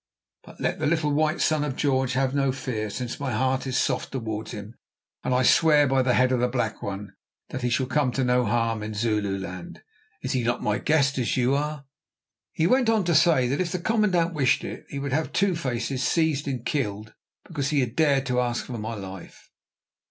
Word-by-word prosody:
But - - -15
let - - -1
the - - 0
little 155 -2 +1
white 155 +2 +1
Son 155 -2 +2
of 145 -3 -3
George 130 -3 +1
have 130 +1 +1
no 140 -1 +2
fear, 120 -5 -3
since 125 +3 -5
my 140 -2 -2
heart 130 +1 0
is 130 - -1
soft 130 -3 0
towards 110 -4 -4
him, 105 +1 -8 0.5
and - - -1
I 125 0 +3
swear 150 +1 +5
by 135 -1 +2
the 125 -1 +2
head 130 0 +3
of 130 - +2
the 125 - +2
Black 120 -3 -2
One 100 +1 -6 0.4
that 130 - -5
he 125 - 0
shall 120 +2 +1
come 130 0 +1
to 135 - 0
no 125 0 +3
harm 115 0 0
in 105 0 -5
Zululand. 100 -5 -3 0.4
Is 130 - -2
he 130 -3 +1
not 120 +1 -1
my 105 0 0
guest, 140 -3 +2
as 120 - 0
you 125 +1 +2
are?" 150 0 -2 0.7
He 160 - 0
then 175 - +2
went 255 -2 +3
on 220 -3 +3
to 170 -1 +1
say 155 -5 +4
that 140 +7 0
if 175 -2 -2
the - - -1
commandant 180 -3 +1
wished 140 -5 +2
it, - - -7
he 140 - -6
would 140 -1 -3
have 155 +2 0
"Two 195 -2 +2
faces" 130 -3 -2
seized 150 +1 +1
and 130 -3 -3
killed 110 -8 -2 0.3
because 145 -5 -2
he 145 -3 +2
had 125 -1 -3
dared 140 -4 +3
to 125 -1 0
ask 120 -1 -2
for 120 -3 -6
my 110 +2 -4
life. 95 -3 -10
130 Hz, 220 wpm, -25 LUFS, 120-150 Hz, 0.7 s, swear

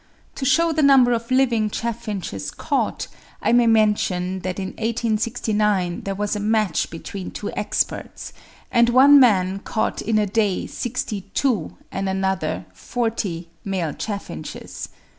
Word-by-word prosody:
To 270 - -4
shew 330 +5 +3
the 310 - +1
number 270 -4 +6
of 230 0 -3
living 245 -5 +2
chaffinches 210 - -4
caught, - - -2 0.3
I - - +1
may 240 0 +5
mention 205 -4 +2
that 185 0 -4
in 190 -1 -3
1869 215 -5 0
there 195 0 -2
was 205 +1 -1
a - - -2
match 215 -4 +1
between 180 +3 -7
two - - -5
experts, - - -3 0.4
and 235 0 +4
one 275 +4 +8
man 195 -6 +4
caught 220 - -2
in 220 0 +1
a 210 - +3
day 205 -2 0
62, 215 - -2
and 195 0 -2
another 190 - -1
40, 200 - -3 0.2
male 180 -6 -2
chaffinches. 205 -2 -6
210 Hz, 135 wpm, -22 LUFS, 190-235 Hz, 0.4 s, one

